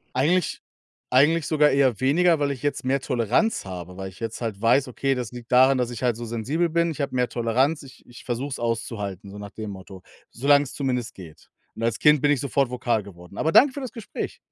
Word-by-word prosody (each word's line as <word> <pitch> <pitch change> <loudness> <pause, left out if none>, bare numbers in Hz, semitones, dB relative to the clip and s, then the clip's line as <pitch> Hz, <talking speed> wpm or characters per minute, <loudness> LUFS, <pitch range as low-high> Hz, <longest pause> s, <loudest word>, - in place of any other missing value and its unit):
Eigentlich 165 +6 +1 0.5
eigentlich 150 +5 +4
sogar 150 -2 +3
eher 130 -5 +2
weniger, 165 +5 +3
weil 145 -1 0
ich 135 -1 -5
jetzt 145 -2 -2
mehr 135 +1 +1
Toleranz 125 - 0
habe, 90 -1 -8
weil 95 0 -6
ich 95 - -18
jetzt 115 +1 -5
halt 105 -3 -4
weiß, 125 +4 +3
okay, 135 +2 -1
das 125 -2 -5
liegt 120 0 -10
daran, 130 +1 +6
dass 125 -1 -1
ich 120 +1 -7
halt 120 -3 +1
so 120 - -6
sensibel 135 +10 -1
bin. 170 +1 +1
Ich 155 - -7
habe 140 - -2
mehr 125 -1 +1
Toleranz. 130 +7 0
Ich 130 -2 -15
ich 120 - -14
versuche 125 +3 -3
es 130 - -5
auszuhalten, 105 -5 -4
so 105 - -10
nach 100 -1 -8
dem 110 -2 -7
Motto, 95 -1 -11 0.3
solang's 140 +1 +2
zumindest 125 -5 -2
geht. 85 -5 -13 0.3
Und 115 - -8
als 115 -1 0
Kind 150 -2 +5
bin 145 - +3
ich 140 -4 +2
sofort 140 -1 0
vokal 120 -3 0
geworden. 90 -1 -13
Aber 160 +1 +1
danke 270 0 +6
für 285 - -6
das 260 - -6
Gespräch. 230 -4 -6
125 Hz, 225 wpm, -24 LUFS, 115-145 Hz, 0.5 s, daran